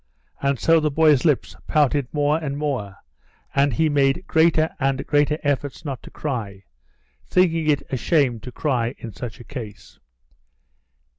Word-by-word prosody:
And 140 -1 +1
so 165 0 +4
the 155 -1 +1
boy's 150 -2 +3
lips 150 -5 +1
pouted 145 -3 +1
more 150 +1 +1
and 140 -3 -4
more, 130 -10 -3 0.6
and 140 +1 +3
he 160 +7 +2
made 145 +4 +1
greater 160 -1 +3
and 135 -1 0
greater 150 0 +2
efforts 145 0 -2
not 135 -4 -4
to - - -12
cry, 110 -9 -5 0.6
thinking 165 -4 +2
it 145 -2 +2
a 130 - 0
shame 135 -5 +1
to 125 - -9
cry 125 -4 -1
in 115 - -8
such 120 +1 -7
a - - -10
case. 115 -6 -9
145 Hz, 155 wpm, -22 LUFS, 125-155 Hz, 0.6 s, so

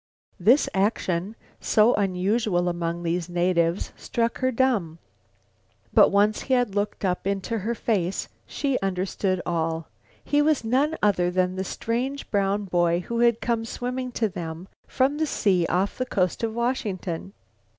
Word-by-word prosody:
This 235 +11 +4
action, 190 -1 0 0.2
so 220 +3 +4
unusual 195 -1 +1
among 170 0 -2
these 170 +1 -1
natives, 175 0 +1
struck 230 0 -2
her 260 0 +1
dumb. 230 -11 +1 1.0
But - - +7
once 205 +2 +2
he 260 - +1
had 245 -5 +1
looked 205 0 -2
up 180 +1 -1
into 200 +3 -1
her 225 +4 -2
face, 195 -5 -1 0.2
she 275 -3 -1
understood 185 -1 -1
all; 165 -1 -2 0.3
he 290 0 +2
was 300 -4 +2
none 275 +8 +1
other 180 -4 +3
than 180 0 0
the 190 - -2
strange 250 +8 -3
brown 200 0 +1
boy 175 -1 +1
who 235 +5 -3
had 235 -1 +3
come 230 -1 0
swimming 250 +2 -4
to 225 - +1
them 170 -1 -6 0.2
from 275 +3 +1
the 315 - +1
sea 185 - +1
off 190 +6 0
the 255 - -1
coast 185 -7 0
of 225 -1 -1
Washington. 200 -7 -2
200 Hz, 150 wpm, -25 LUFS, 180-235 Hz, 1.0 s, But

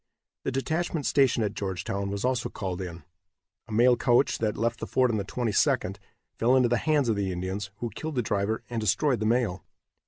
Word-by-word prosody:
The - - 0
detachment 160 +3 -1
stationed 130 -5 +3
at 105 - -2
Georgetown 100 +1 -3
was 100 +3 -3
also 125 -2 0
called 95 -2 -4
in. 85 -3 -7 0.6
A - - -11
mail 120 +3 +5
coach 120 +2 +2
that 110 -2 -1
left 115 +1 0
the - - -5
fort 130 -2 +2
on 110 - 0
the 100 - -1
22d, 115 -1 0 0.4
fell 120 +3 +4
into 125 -2 +4
the 120 - +2
hands 150 -1 +2
of 115 - +2
the 100 -2 -1
Indians, 95 +3 -3
who 120 -2 -2
killed 155 +4 -5
the 125 - +1
driver 105 +1 -1
and 120 -2 -3
destroyed 125 +5 +2
the 110 - 0
mail. 110 -7 +1
115 Hz, 205 wpm, -27 LUFS, 100-125 Hz, 0.6 s, mail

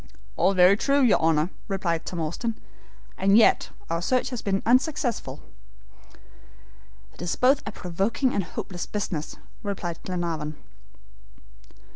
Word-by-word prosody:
"All 195 - +2
very 180 +2 +7
true, 280 +4 +2
your 240 - +5
Honor," 160 +1 +2 0.2
replied 175 -5 -2
Tom 175 - -4
Austin, 220 +9 -3 0.6
"and 195 +2 +5
yet 230 - +4 0.2
our 165 0 -2
search 255 +8 0
has 245 - -4
been 195 -1 -1
unsuccessful." 255 0 0 1.7
"It - - -14
is 175 -1 -1
both 265 +3 +4
a - - -3
provoking 200 +9 -1
and 200 - 0
hopeless 175 +1 -6
business," 180 -7 -3 0.3
replied 190 -6 -4
Glenarvan. 165 -4 -3
195 Hz, 125 wpm, -25 LUFS, 170-230 Hz, 1.7 s, very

